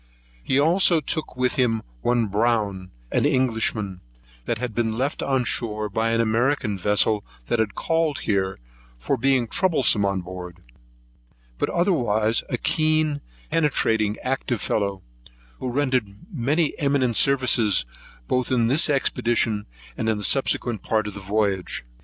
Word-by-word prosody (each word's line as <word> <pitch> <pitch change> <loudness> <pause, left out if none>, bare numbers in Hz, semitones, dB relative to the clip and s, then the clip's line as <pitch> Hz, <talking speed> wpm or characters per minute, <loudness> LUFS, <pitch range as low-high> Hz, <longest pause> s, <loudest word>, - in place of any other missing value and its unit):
He 130 - 0
also 170 +2 +4
took 155 -1 -4
with 125 0 +1
him 115 -3 +1 0.2
one 120 -1 +2
Brown, 105 -3 0 0.2
an - - +1
Englishman, 110 -8 0 0.4
that 115 - -1
had 120 -1 -4
been 115 0 -1
left 135 +4 -1
on 135 -2 +1
shore 110 -3 -1
by 110 +3 0
an 115 0 +1
American 115 0 +1
vessel 105 +2 +2 0.2
that 115 - 0
had 110 -2 -1
called 165 -3 0
there, 95 -3 0 0.4
for - - -1
being 135 -3 +2
troublesome 140 - +2
on 100 -1 0
board: 90 -1 -8 1.0
but - - 0
otherwise 120 - +1
a 125 - -1
keen, 155 0 +1 0.3
penetrating, 110 -9 +1
active 130 -2 -1
fellow, 100 -2 -1 0.6
who 130 - -3
rendered 130 -3 0 0.3
many 150 +4 +1
eminent 140 -5 +1
services, 120 - +3 0.4
both 125 0 0
in 120 -3 +2
this 145 +5 +4
expedition 120 -6 0 0.3
and 110 - -3
the 105 -2 0
subsequent 120 -3 +1
part 110 -1 0
of 105 - -5
the 100 - -7
voyage. 100 - -1
115 Hz, 140 wpm, -23 LUFS, 105-135 Hz, 1.0 s, also